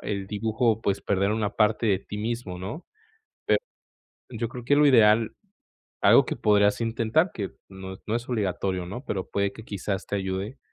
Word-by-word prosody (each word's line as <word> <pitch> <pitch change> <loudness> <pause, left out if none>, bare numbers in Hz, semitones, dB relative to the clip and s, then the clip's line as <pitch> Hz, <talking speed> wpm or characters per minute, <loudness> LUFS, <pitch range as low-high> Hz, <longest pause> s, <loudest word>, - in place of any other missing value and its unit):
el 100 -2 -3
dibujo, 110 +2 0
pues, 100 -3 0
perder 100 +1 +1
una 110 -2 0
parte 110 +1 +2
de 95 -3 +3
ti 105 - -8
mismo, 110 -4 -3
¿no? 105 - -7 0.6
Pe - - +4 0.7
yo 115 -1 -3
creo 125 0 -8
que 145 +4 +3
lo 150 0 +6
ideal, 110 -3 +5 0.7
algo - - +6
que - - -3
podrías 105 -1 +3
intentar, 115 - +1
que 100 -3 -4 0.2
no 95 0 -8
no 110 - -1
es 120 +1 -4
obligatorio, 95 -5 -1
¿no?, 120 +9 -7
pero 95 -2 -3
puede 100 0 0
que 110 - -11
quizás 100 -1 -3
te - - -2
ayude 95 +5 -3
105 Hz, 180 wpm, -26 LUFS, 100-115 Hz, 0.7 s, lo